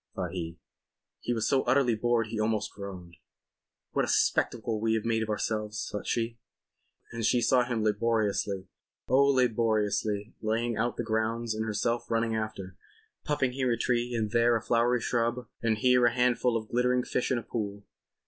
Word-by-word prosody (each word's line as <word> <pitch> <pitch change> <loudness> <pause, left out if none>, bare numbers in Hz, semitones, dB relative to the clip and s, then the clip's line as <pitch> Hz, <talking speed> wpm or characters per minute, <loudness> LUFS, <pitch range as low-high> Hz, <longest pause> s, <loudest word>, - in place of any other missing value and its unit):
thought - - -3
he. 85 -2 -5 0.6
He - - -3
was 115 -2 0
so 135 - +3
utterly 125 -1 +3
bored 115 +1 +1
he 110 -1 -4
almost 110 -2 0
groaned. 95 -4 -9 0.7
"What - - +1
a - - -1
spectacle 110 -2 +1
we 110 0 +2
have 110 - -2
made 115 -1 +1
of 110 - -3
ourselves," 105 0 -2
thought 105 - -5
she. 115 0 -1 0.7
And 115 -1 -4
she 120 +2 +3
saw 125 +1 +3
him 120 -3 -1
laboriously—oh, 105 +3 0
laboriously—laying 110 -2 0
out 120 +2 -1
the - - -1
grounds 110 +1 -1
and 110 +1 -2
herself 115 +3 -1
running 115 0 +1
after, 105 -4 -5 0.5
putting 135 -4 +1
here 130 -1 0
a 115 - +1
tree 120 +1 0
and 110 -2 -1
there 120 0 +4
a 115 - 0
flowery 120 +1 +2
shrub 120 +1 -1
and 115 -2 +1
here 125 0 +4
a 120 - +1
handful 125 -1 +2
of 110 -1 -7
glittering 125 +1 +2
fish 125 - -1
in 130 - +2
a 115 - -4
pool. 100 -3 -4
115 Hz, 170 wpm, -29 LUFS, 110-120 Hz, 0.7 s, there